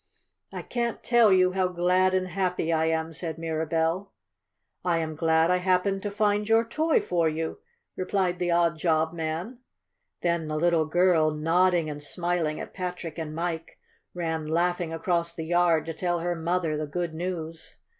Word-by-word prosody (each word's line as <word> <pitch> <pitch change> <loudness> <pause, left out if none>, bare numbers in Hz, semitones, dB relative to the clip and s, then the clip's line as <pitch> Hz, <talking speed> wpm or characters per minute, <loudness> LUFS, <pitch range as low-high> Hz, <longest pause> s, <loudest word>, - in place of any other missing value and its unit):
"I - - -6
can't 235 -1 -3
tell 235 -3 +5
you 185 -1 +4
how 185 0 +1
glad 180 +1 +2
and 185 0 0
happy 180 -2 -1
I 160 0 +2
am," 160 0 -1
said 165 0 -4
Mirabell. 165 +3 -1 0.7
"I 175 -2 +1
am 160 -1 -3
glad 160 +1 +3
I 180 - +4
happened 185 +2 +1
to 205 - -3
find 205 +1 0
your 225 +1 +4
toy 310 +7 +2
for 170 -2 +1
you," 160 - -4 0.4
replied 185 -1 -1
the 175 -1 0
odd 170 -1 +2
job 160 -1 +1
man. 170 +9 -4 0.6
Then, 170 -2 0
the 155 0 -2
little 165 0 +2
girl, 170 -1 +3
nodding 165 +2 +2
and 145 -1 -6
smiling 170 0 -1
at - - -7
Patrick 180 -3 -5
and 155 -1 -5
Mike, 165 -1 -4 0.4
ran 160 -3 -2
laughing 175 +1 0
across 170 0 -1
the 160 - -5
yard 175 -1 +2
to 165 - -4
tell 175 +2 -1
her 175 +1 0
mother 165 -1 -1
the 155 0 -3
good 170 +2 -3
news. 165 -1 -5
170 Hz, 170 wpm, -26 LUFS, 160-180 Hz, 0.7 s, tell